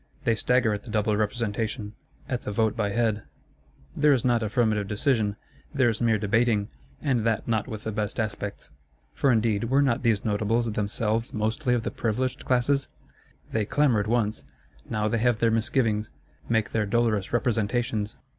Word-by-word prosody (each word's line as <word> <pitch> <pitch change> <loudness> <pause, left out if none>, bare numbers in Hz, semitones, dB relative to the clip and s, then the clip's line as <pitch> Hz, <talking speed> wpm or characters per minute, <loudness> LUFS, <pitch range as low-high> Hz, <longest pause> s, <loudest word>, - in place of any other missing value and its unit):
They 115 - +3
stagger 120 0 +2
at 105 - -4
the 120 - -12
Double 105 0 +1
Representation, 105 0 -2 0.3
at 125 -2 -2
the - - -5
Vote 110 +1 +1
by 105 -2 0
Head: 110 0 0 0.7
there 150 -1 +4
is 130 -3 0
not 120 -2 +3
affirmative 110 -2 +1
decision; 105 -1 +1 0.4
there 130 -3 +4
is 110 0 -3
mere 115 -2 +3
debating, 105 0 +1 0.3
and 130 -6 +1
that 115 -1 0
not 110 -3 0
with 110 -4 -6
the 110 - -3
best 105 +2 -3
aspects. 105 -2 -4 0.4
For, 140 - +2
indeed, 110 -2 +1
were 135 +4 +2
not 130 -2 +1
these 115 -5 +1
Notables 110 +2 +1
themselves 105 +2 -1
mostly 110 +3 0
of 115 - -1
the - - -3
Privileged 125 +3 -2
Classes? 130 +2 +2 0.6
They 110 - +1
clamoured 115 -3 +2
once; 110 - 0 0.5
now 105 -1 0
they 115 +1 0
have 120 0 +2
their 115 0 +2
misgivings; 110 -2 +1 0.4
make 110 -2 +1
their 105 -2 0
dolorous 110 -3 +1
representations. 115 -2 0
110 Hz, 165 wpm, -26 LUFS, 105-120 Hz, 0.7 s, there